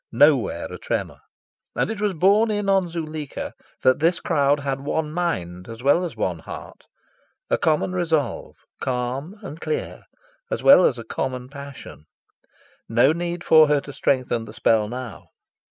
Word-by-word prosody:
Nowhere - - +3
a - - -7
tremour. - - -3 0.6
And - - 0
it 215 -2 -5
was 205 -3 0
borne 200 +7 +4
in 205 -1 -1
on 195 -2 +2
Zuleika 155 -3 -5 0.3
that 130 - +4
this 170 +3 +2
crowd 145 -3 +2
had 135 -1 -2
one 150 +2 -2
mind 90 - -3
as 115 +2 -9
well 145 +6 +4
as 170 -8 -5
one 90 -5 -1
heart - - -10 0.7
a - - +4
common 160 +3 +1
resolve, 165 -5 -1 0.2
calm 130 +8 -3
and 165 -4 -8
clear, 460 +2 -4 0.4
as - - -3
well 275 -10 +8
as 125 - +2
a 115 - -7
common 125 +2 -4
passion. 140 - -10 0.8
No 120 +6 +4
need 175 +1 -4
for 155 -1 +7
her 145 0 +3
to 140 - -10
strengthen 125 -5 0
the 105 - -11
spell 110 -2 +2
now. 125 -1 -7
145 Hz, 160 wpm, -23 LUFS, 125-175 Hz, 0.8 s, well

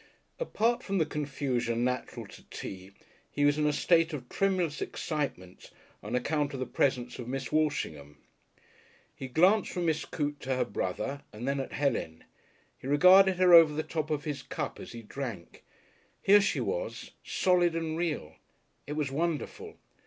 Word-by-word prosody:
Apart 235 - +1
from 195 0 -2
the 160 - +3
confusion 135 -6 -2
natural 125 0 -2
to - - -14
tea, 95 0 -7 0.4
he 145 - 0
was 145 +1 +3
in 150 - +2
a - - +3
state 165 +2 +3
of 130 -4 -6
tremulous 185 -6 0
excitement 135 - -4 0.3
on 105 +4 -4
account 145 +2 0
of - - -5
the 130 - -1
presence 125 -1 0
of 120 - -6
Miss 135 0 -4
Walshingham. 80 - -1 1.0
He 130 - -6
glanced 185 - +3
from 175 -1 -2
Miss 160 -1 +1
Coote 145 -1 -3
to 130 0 -2
her 130 - +1
brother 100 +8 -3
and 115 +3 -7
then 140 0 0
at 135 - -5
Helen. 120 - -1 0.6
He - - -8
regarded 185 +6 +7
her 180 -1 +5
over 165 -3 +8
the 155 - -1
top 155 -2 -3
of 150 -2 -1
his 150 -3 -4
cup - - -5
as - - -9
he 115 -1 -8
drank. 110 -7 -7 0.6
Here 205 +1 +6
she 195 - 0
was, - - -4
solid 175 -3 +2
and 165 -1 -2
real. 155 - -3 0.5
It 145 - -3
was 150 -3 -2
wonderful. 160 +2 -3
145 Hz, 165 wpm, -29 LUFS, 125-165 Hz, 1.0 s, over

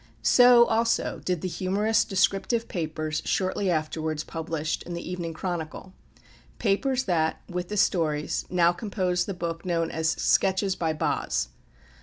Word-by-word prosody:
So 245 -1 +7
also 230 0 0
did 180 -3 -1
the - - -2
humorous 205 +4 +1
descriptive 200 +4 +1
papers 155 -2 -3
shortly 190 +1 0
afterwards 155 -1 -1
published 160 -1 -3
in 175 - -6
The 170 - -6
Evening 170 -2 -4
Chronicle, 175 +1 -5 0.6
papers 255 +5 +1
that, 165 -7 0
with 180 -1 -4
the 210 - -3
stories, 155 -6 +1
now 175 -1 +4
compose 180 -2 -1
the 200 - -4
book 170 -1 -4
known 165 -2 -1
as 160 0 0
"Sketches 190 +2 +2
by 165 -3 -1
Boz." 155 - -1
180 Hz, 140 wpm, -26 LUFS, 160-195 Hz, 0.6 s, So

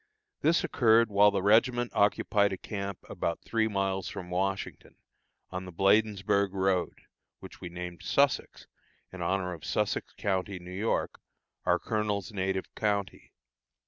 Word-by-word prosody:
This 165 +2 +3
occurred 115 -2 +4
while 100 +1 +6
the 100 -2 -1
regiment 120 +3 +3
occupied 100 0 +2
a 95 - -3
camp 100 -1 -5
about 85 - -3
three 110 -1 +1
miles 95 -2 -1
from 90 -1 -7
Washington, 95 +2 -3 0.6
on 90 0 -5
the 90 - -8
Bladensburg 100 +1 +2
road, 95 -2 0 0.4
which - - -12
we 90 - -6
named 90 0 -7
Sussex, 140 -1 +1 0.5
in 95 - -7
honor 90 +1 -1
of 80 -4 -10
Sussex - - -1
county, 95 -1 -1
New 90 0 -10
York, 100 +5 -2 0.5
our 90 - +4
colonel's 105 0 -2
native 95 -1 -2
county. 100 -2 -2
100 Hz, 140 wpm, -29 LUFS, 95-105 Hz, 0.6 s, while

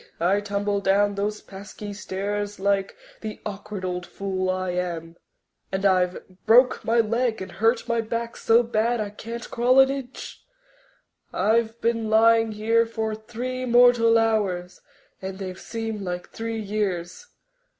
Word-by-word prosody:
I 190 +4 +2
tumbled 200 0 -1
down 200 +1 +3
those 205 +1 -2
pesky 205 +1 -9
stairs 205 +1 -4
like 195 0 0 0.2
the 215 -1 -6
awkward 200 -1 -6
old 180 -1 -3
fool 190 -1 -3
I 185 0 -1
am 170 -2 -4 0.6
and 190 +1 -2
I've 185 -2 +2 0.2
broke 250 +3 +5
my 230 +1 +2
leg 230 +1 0
and 190 - -7
hurt 225 +3 +1
my 235 -1 +1
back 230 +1 -4
so 230 +2 +4
bad 235 +1 0
I 210 -1 -3
can't 230 +3 -7
crawl 250 +2 +4
an 265 0 +6
inch. 270 -2 -7 0.9
I've 225 +3 +1
been 230 -1 0
lying 225 0 +4
here 225 +2 +2
for 220 -1 -2
three 240 +4 -5
mortal 240 -1 +5
hours 200 -6 0 0.4
and 190 0 -5
they've 185 -2 -6
seemed 225 -2 -4
like 180 -2 -5
three 225 0 -4
years. 200 - -3
215 Hz, 145 wpm, -24 LUFS, 195-230 Hz, 0.9 s, an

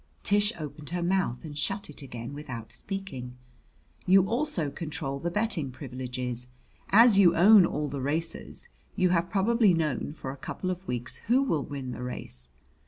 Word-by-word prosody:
Tish 205 +1 +3
opened 150 -1 -7
her 175 0 -2
mouth 175 -8 0
and 150 -2 -7
shut 195 +7 -1
it 150 - -7
again 120 -1 -7
without 130 -6 -7
speaking. 135 -12 -5 0.7
"You 190 +1 +6
also 215 - 0
control 140 -4 -4
the 170 - -2
betting 190 - 0
privileges. 125 -2 -5 0.4
As 220 -1 +7
you 175 -4 +6
own 195 +1 +8
all 150 0 -2
the 140 -1 -4
racers 160 +5 -2 0.3
you 185 -3 +3
have 170 -1 +1
probably 210 -1 +3
known 150 -3 -1
for 135 -4 -6
a 140 - -9
couple 185 +7 -4
of 185 +1 -6
weeks 120 0 -3
who 255 +4 +4
will 160 - 0
win 135 -3 -5
the 125 - -6
race. 65 - -5
155 Hz, 170 wpm, -28 LUFS, 130-195 Hz, 0.7 s, own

